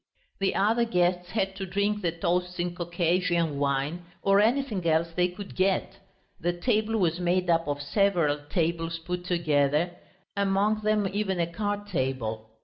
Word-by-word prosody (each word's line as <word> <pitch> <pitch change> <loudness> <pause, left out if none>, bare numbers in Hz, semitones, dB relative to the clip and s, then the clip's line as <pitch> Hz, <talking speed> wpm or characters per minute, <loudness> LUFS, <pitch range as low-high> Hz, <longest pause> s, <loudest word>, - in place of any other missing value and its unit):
The 195 -1 +1
other 220 +4 +3
guests 180 -5 +1
had 195 -2 -1
to 195 - -3
drink 200 +3 0
the 170 -3 0
toasts 180 +2 -1
in 175 0 -1
Caucasian 175 -2 0
wine 140 +5 -1 0.2
or 195 0 +4
anything 225 -3 +1
else 165 +1 +2
they 180 0 +3
could 190 +2 -9
get. 190 0 0 0.4
The 175 - 0
table 220 +4 0
was 175 -4 +1
made 180 0 +1
up 165 -1 +2
of 145 0 -2
several 170 -3 +2
tables 165 -1 -1
put 175 +2 -5
together, 155 -2 +1 0.4
among 200 +2 +1
them 210 -1 +2
even 195 -3 -1
a 170 - +3
card 205 +4 -3
table. 130 - -2
180 Hz, 155 wpm, -27 LUFS, 165-200 Hz, 0.4 s, or